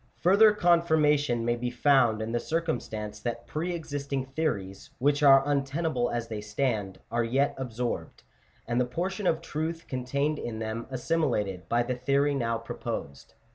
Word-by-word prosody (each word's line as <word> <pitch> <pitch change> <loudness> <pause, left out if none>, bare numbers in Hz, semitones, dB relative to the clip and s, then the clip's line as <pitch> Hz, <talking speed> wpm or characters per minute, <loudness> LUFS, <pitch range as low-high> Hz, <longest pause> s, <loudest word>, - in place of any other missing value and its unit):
M 120 - -34 0.2
Farther 200 +5 +7
confirmation 155 - +3
may 120 0 +2
be 120 +1 -3
found 120 -4 +3
in 110 - -4
the 120 - 0
circumstance 110 -10 -3
that 120 0 -4
pre 170 +4 -3
existing 140 -4 -3
theories, 130 -8 -3
which 145 +2 +2
are 135 -1 +7
untenable 140 -2 0
as 120 -1 -3
they 110 -2 -5
stand, 105 -3 -2
are 120 0 +1
yet 135 +5 +1
absorbed, 120 - -4 0.4
and 120 +2 +1
the - - +2
portion 185 +9 -2
of 160 - +1
truth 160 +2 -4
contained 140 +4 -1
in 115 -2 -4
them 110 +1 -4
assimi 155 +4 0 0.2
lated, 95 -2 -8
by 120 +1 +2
the 125 - -2
theory 140 +3 +1
now 115 -4 0
proposed. 70 -10 -6
130 Hz, 165 wpm, -28 LUFS, 115-150 Hz, 0.4 s, Farther